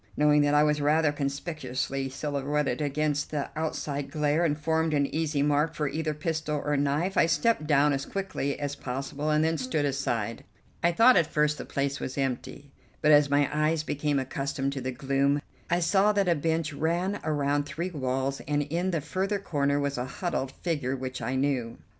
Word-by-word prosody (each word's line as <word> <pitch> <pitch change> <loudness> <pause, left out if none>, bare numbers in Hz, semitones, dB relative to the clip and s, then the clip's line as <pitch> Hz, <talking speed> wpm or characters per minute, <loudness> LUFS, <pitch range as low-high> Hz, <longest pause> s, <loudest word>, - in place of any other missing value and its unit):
Knowing 150 0 +5
that 145 0 +3
I 150 - +6
was 150 -1 +2
rather 150 +1 +3
conspicuously 140 -2 -3
silhouetted 145 +2 -1
against 145 0 0
the 145 -2 -3
outside 150 -2 -3
glare 150 +2 +1
and 150 -3 +1
formed 160 0 +1
an 140 -1 +3
easy 150 -3 0
mark 150 +2 +1
for 150 - -1
either 155 +1 -2
pistol 155 -1 -2
or 145 0 +1
knife, 145 +7 0
I - - +5
stepped 170 -1 +1
down 145 -1 +4
as 135 0 -3
quickly 190 -8 -3
as 145 -1 -3
possible 135 +3 -4
and 150 0 +3
then 160 0 +1
stood 140 +3 0
aside. 120 -5 -2 0.4
I 170 - +3
thought 230 +7 +6
at 170 -3 +3
first 150 -1 +1
the - - -5
place 140 0 -2
was 130 - -5
empty, 135 +1 -3 0.3
but 155 - +4
as 145 -1 +6
my 145 0 +3
eyes 155 +1 +1
became 145 -1 -1
accustomed 135 +1 -2
to 135 - -4
the 130 +1 -2
gloom 140 +2 +1 0.3
I 175 - +2
saw 195 +4 +3
that 200 -2 +1
a 175 - +5
bench 160 0 -1
ran 175 +7 -1
around 145 -1 0
three 170 +5 -4
walls 135 -2 -2
and 145 0 +1
in 170 +6 -1
the 165 -4 -1
further 190 +7 -1
corner 145 -7 0
was 140 -2 -1
a 125 - -2
huddled 135 -2 -3
figure 145 -7 -1
which 130 0 -5
I 130 - -2
knew. 130 -4 -1
145 Hz, 190 wpm, -28 LUFS, 140-160 Hz, 0.4 s, I